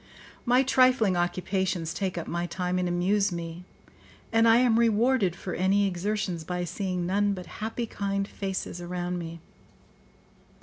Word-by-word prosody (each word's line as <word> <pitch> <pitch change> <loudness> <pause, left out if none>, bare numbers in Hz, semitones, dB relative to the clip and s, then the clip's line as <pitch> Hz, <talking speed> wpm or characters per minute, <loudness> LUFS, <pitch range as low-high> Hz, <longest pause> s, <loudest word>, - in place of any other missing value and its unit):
My 250 +2 +5
trifling 255 -6 +4
occupations 175 -1 -1
take 190 -3 -2
up 170 - -3
my 170 +1 -2
time 180 +1 -2
and 180 - 0
amuse 195 +3 +1
me, 170 +1 -6 0.7
and 225 0 +5
I 225 0 +7
am 240 -2 +4
rewarded 230 -4 +3
for 185 - -6
any 195 +3 +2
exertions 190 -2 -2
by 180 +2 -3
seeing 180 0 -2
none 200 +3 +1
but 180 -1 -7 0.2
happy, 225 +2 -2
kind 200 -2 -2
faces 190 -3 -4
around 175 0 -3
me. 165 -1 -7
190 Hz, 145 wpm, -27 LUFS, 175-210 Hz, 0.7 s, I